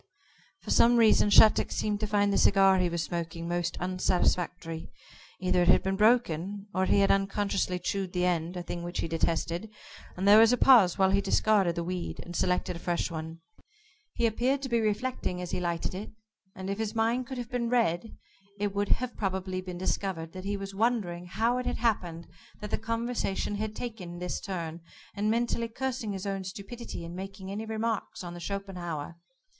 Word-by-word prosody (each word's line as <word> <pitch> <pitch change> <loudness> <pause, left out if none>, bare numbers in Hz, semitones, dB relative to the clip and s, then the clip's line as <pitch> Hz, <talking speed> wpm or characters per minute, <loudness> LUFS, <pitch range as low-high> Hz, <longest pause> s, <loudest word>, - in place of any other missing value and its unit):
For - - -4
some 240 +1 +5
reason 220 -2 +5
Shattuck 215 +1 +6
seemed 210 -1 -1
to 215 - -2
find 205 -1 +2
the - - +2
cigar 195 -1 +5
he 180 -1 +2
was 170 -1 -2
smoking 170 0 -4
most 175 0 -1
unsatisfactory. 180 -2 -1 0.5
Either 185 -1 +2
it 175 - +2
had - - +5
been 190 0 0
broken, 205 -3 +2
or 185 0 +1
he 200 - +4
had 195 - +4
unconsciously 195 -1 0
chewed 190 0 -2
the 180 0 0
end 175 0 -1
a 175 - -4
thing 175 0 -5
which 175 +1 -3
he - - -2
detested 165 +4 -1 0.5
and 190 +2 -1
there 210 +2 +9
was 225 +1 +7
a 250 - +3
pause 230 -11 +6
while 190 -1 +4
he 200 +1 +3
discarded 200 -5 +2
the 170 - -2
weed, 180 0 -4
and 175 - -9
selected 180 0 0
a - - -7
fresh 175 0 -1
one. 160 0 -6 0.7
He 235 - +1
appeared 250 +5 +1
to 265 - -3
be 235 -1 +2
reflecting 215 -3 -1
as 180 -1 -5
he - - -1
lighted 170 -1 -2
it, 195 +4 -6 0.5
and 190 0 -6
if 200 +2 -3
his 220 0 -2
mind 230 +3 +1
could 265 -1 -6
have 240 -2 -6
been 240 -2 -1
read, 225 -4 0 0.4
it 205 -1 -1
would 205 0 -1
have 250 0 0
probably 190 -2 -2
been 180 -1 -7
discovered 180 -3 -2
that 185 0 -8
he 200 0 -1
was 195 0 -6
wondering 195 -5 0
how 230 +6 +1
it 250 - -4
had - - -1
happened 180 -8 -1 0.3
that 210 0 -7
the - - +1
conversation 230 -3 -2
had 215 0 -3
taken 195 -8 -6
this 180 0 -4
turn, 170 -3 -5 0.3
and 210 +1 -1
mentally 235 0 0
cursing 245 -1 -3
his 195 0 -5
own 195 -1 -2
stupidity 200 0 -7
in 170 - -8
making 190 +1 -7
any 210 +2 -4
remarks 220 -3 -3
on 175 -1 -6
the 175 - -8
Schopenhauer. 175 -5 -5
195 Hz, 195 wpm, -29 LUFS, 175-220 Hz, 0.7 s, there